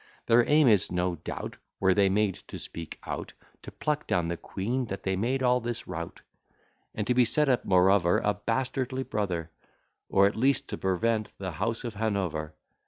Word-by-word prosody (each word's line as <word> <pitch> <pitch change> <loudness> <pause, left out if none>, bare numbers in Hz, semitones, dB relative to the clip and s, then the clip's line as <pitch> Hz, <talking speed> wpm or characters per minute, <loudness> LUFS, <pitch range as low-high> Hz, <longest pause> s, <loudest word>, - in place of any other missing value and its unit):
Their 115 +1 +4
aim 150 -1 +6
is, 105 -5 +4
no 90 -1 0
doubt, - - -6 0.2
Were 95 -1 +4
they 100 0 +4
made 100 0 +2
to - - -7
speak 85 -1 -7
out, - - -5 0.3
To - - -9
pluck 150 -1 -2
down 85 -2 +1
the 85 - -1
queen, 120 +9 -3
that 100 -3 -6
they 95 0 0
make 125 +7 0
all 125 0 +4
this 120 -1 -5
rout; 85 +1 -6 0.7
And 105 - -2
to 125 +2 +4
set 145 +6 +2
up, 125 -3 +2
moreover, 90 -1 +4
A 105 - +2
bastardly 130 +4 -2
brother; 90 -9 -2 0.6
Or 100 0 +5
at 100 - +1
least 135 +5 +1
to - - -3
prevent 110 +4 0
the 95 -2 -4
House 110 +8 -2
of 120 -2 -4
Hanover. 95 -8 -2
105 Hz, 180 wpm, -28 LUFS, 95-125 Hz, 0.7 s, aim